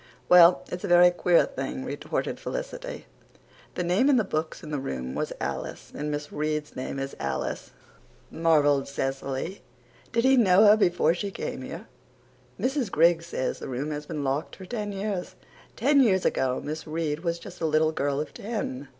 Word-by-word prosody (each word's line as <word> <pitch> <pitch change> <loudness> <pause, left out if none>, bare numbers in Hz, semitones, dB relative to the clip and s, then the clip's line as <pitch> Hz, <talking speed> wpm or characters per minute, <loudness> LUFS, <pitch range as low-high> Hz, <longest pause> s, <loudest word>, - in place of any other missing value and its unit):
"Well, 175 0 +7
it's 180 - -5
a - - -2
very 175 0 +7
queer 175 -1 +3
thing," - - -5
retorted - - -3
Felicity. - - -6 0.7
"The 180 - -1
name 185 +11 +3
in 280 - +5
the 225 - +3
books 160 -4 -3
in 155 - -8
the 145 - -1
room 65 - -4
was - - -2
Alice 65 0 -5
and 150 +1 -4
Miss 145 0 -4
Reade's 150 0 -2
name 130 +1 -4
is 135 0 -4
Alice," 70 -1 -3 0.6
marvelled 145 -4 +3
Cecily. 135 +5 -3 0.5
"Did 235 -1 +1
he 265 +1 +5
know 200 -3 +6
her 210 0 +8
before 175 -6 +3
she 200 +3 -3
came - - -5
here?" - - -7 0.7
"Mrs. 260 -4 0
Griggs 170 0 +3
says 130 - -2
that - - -7
room 135 +4 -3
has 150 0 -5
been 150 -3 -4
locked 140 +3 -2
for 190 - -10
ten 210 0 -4
years. 195 -2 -4 0.4
Ten 285 -1 +4
years 190 -7 +3
ago 130 -1 +1
Miss 155 +2 -6
Reade 155 -1 -2
was 170 0 -2
just 170 - -11
a 165 - +1
little 155 +1 +3
girl 140 -2 -1
of 150 -1 -4
ten. 200 - -4
165 Hz, 180 wpm, -26 LUFS, 145-195 Hz, 0.7 s, her